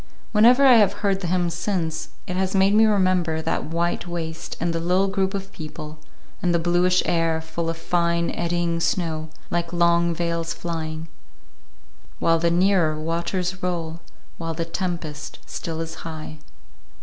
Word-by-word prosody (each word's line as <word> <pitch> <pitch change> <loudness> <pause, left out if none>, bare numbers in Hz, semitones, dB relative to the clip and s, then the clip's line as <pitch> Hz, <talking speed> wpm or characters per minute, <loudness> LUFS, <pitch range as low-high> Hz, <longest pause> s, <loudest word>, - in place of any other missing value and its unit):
Whenever 240 +6 +6
I 255 -3 +8
have 205 -1 +2
heard 195 -1 +2
the 180 - -2
hymn 175 -1 +1
since, 170 -2 -2 0.2
it 180 - -4
has 190 +1 0
made 195 +1 +4
me 220 +1 +6
remember 185 -5 +2
that 160 +1 -1
white 170 +3 -1
waste 165 -1 -5
and 170 +1 0
the 165 - -1
little 180 +3 +2
group 195 0 0
of 195 0 -5
people; 155 -1 -8 0.4
and 175 -1 +2
the - - +5
bluish 175 +2 +3
air, 165 -2 +1
full 160 +1 -4
of 165 - -3
fine, 170 0 +1
eddying 170 -1 -1
snow, 165 -2 -1 0.2
like 170 -1 -1
long 170 0 +3
veils 170 -1 -1
flying:— 160 -1 -4 1.1
"While 165 0 +3
the 170 +1 +2
nearer 175 -3 +3
waters 170 +3 -2
roll, 170 -2 -2 0.4
While 165 -1 -3
the 165 0 -2
tempest 165 -4 -4
still 165 -1 -5
is 165 0 -5
high." 155 -1 -7
170 Hz, 160 wpm, -23 LUFS, 165-180 Hz, 1.1 s, I